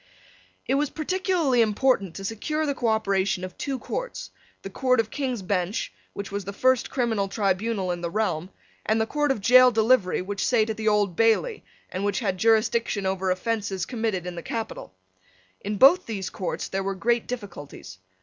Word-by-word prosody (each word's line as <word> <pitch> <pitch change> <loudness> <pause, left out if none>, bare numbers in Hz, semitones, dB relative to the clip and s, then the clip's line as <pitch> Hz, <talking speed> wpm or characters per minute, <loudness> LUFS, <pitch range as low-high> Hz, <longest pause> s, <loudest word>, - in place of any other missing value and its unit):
It - - 0
was 285 +1 +1
peculiarly 330 -6 +1
important 215 -4 +1
to 195 - -6
secure 305 +9 -2
the 285 - 0
cooperation 200 -6 0
of 185 -1 -6
two 275 -2 -3
courts; - - -5 0.3
the 195 - -5
court 255 +3 +2
of 220 -1 0
King's 255 -7 -3
Bench, 185 +1 -1 0.2
which 200 -1 -6
was 200 0 -3
the 200 +2 -6
first 255 +3 +2
criminal 225 -6 0
tribunal 195 -1 0
in 175 -1 -4
the 170 - -2
realm, 180 -4 -1 0.3
and 220 +1 +1
the 220 - +2
court 295 +4 0
of 225 -7 -1
gaol 255 +1 +8
delivery 220 -5 +2
which 200 +1 -3
sate 225 -3 +2
at 220 - -6
the 220 0 -3
Old 205 -4 +2
Bailey, 225 - +2 0.3
and 185 - -3
which 205 -1 0
had 195 -6 -2
jurisdiction 220 -1 +2
over 190 0 -1
offences 195 -1 -1
committed 220 -6 -2
in 180 - -4
the 170 - -6
capital. 225 - -5 0.6
In 205 +1 -4
both 285 - +6
these 195 -4 -4
courts 185 -5 -4
there 195 - -2
were 195 0 -2
great 235 +4 0
difficulties. 145 - -8
215 Hz, 180 wpm, -25 LUFS, 195-245 Hz, 0.6 s, gaol